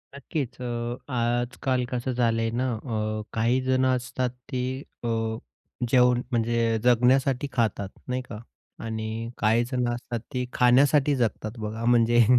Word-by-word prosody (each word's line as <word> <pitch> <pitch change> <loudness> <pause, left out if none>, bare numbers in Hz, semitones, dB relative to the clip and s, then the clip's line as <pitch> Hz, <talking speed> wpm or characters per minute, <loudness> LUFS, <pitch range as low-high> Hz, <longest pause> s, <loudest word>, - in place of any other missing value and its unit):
नक्कीच. 140 -2 -4
अ, 120 0 -3 0.2
आजकाल 120 +1 0
कसं 125 +1 -1
झालंय 115 -2 +1
ना, 125 +2 0
अ, 110 -2 -3
काही 120 +3 +2
जणं 130 0 +3
असतात, 125 0 -2 0.2
ती 125 -1 -1 0.4
अ, - - -1 0.8
जेवण 125 -1 +5
म्हणजे 115 -1 +1
जगण्यासाठी 130 +3 +3
खातात, 110 -5 0 0.2
नाही 125 0 -1
का? 115 -4 -9 0.5
आणि 110 +1 -4
काहीजण 120 +3 +1
असतात, 120 -1 -4
ते 125 -1 -1
खाण्यासाठी 135 +3 +4
जगतात. 110 -3 -1
बघा 110 +2 -4
म्हणजे, 120 -1 +5
120 Hz, 125 wpm, -26 LUFS, 115-125 Hz, 0.8 s, जेवण